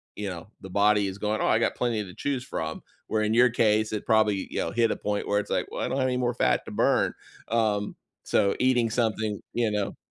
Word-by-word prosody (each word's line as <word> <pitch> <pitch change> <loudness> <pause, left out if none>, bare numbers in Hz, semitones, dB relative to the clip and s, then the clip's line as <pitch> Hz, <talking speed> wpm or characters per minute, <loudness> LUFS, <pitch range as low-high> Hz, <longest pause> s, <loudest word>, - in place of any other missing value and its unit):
you 105 -1 -4
know, 85 -2 -7
the 95 - -9
body 100 +1 +3
is 95 +1 -5
going, 105 +1 -1
"Oh, - - +1
I 110 - +3
got - - 0
plenty 115 -4 -1
to 90 -2 -10
choose 135 -3 -2
from," 80 -9 -4 0.3
where 110 -1 0
in 110 +1 +1
your 125 +2 +6
case, 110 -2 +2
it 105 - -3
probably, 105 -3 +2
you - - -3
know, - - -1
hit 115 -1 +2
a - - 0
point 105 0 -2
where 105 0 +2
it's 105 - -6
like, - - 0
"Well, - - -4
I - - 0
don't 130 - -2
have 130 - +2
any 125 -1 0
more 125 -1 0
fat 120 - +1
to - - -8
burn," - - +2 0.4
um, 110 -3 0 0.3
so 100 - +2
eating 125 -2 +3
something 110 -2 -1
you 115 -2 +1
know? 105 -2 -2
110 Hz, 250 wpm, -26 LUFS, 105-115 Hz, 0.4 s, your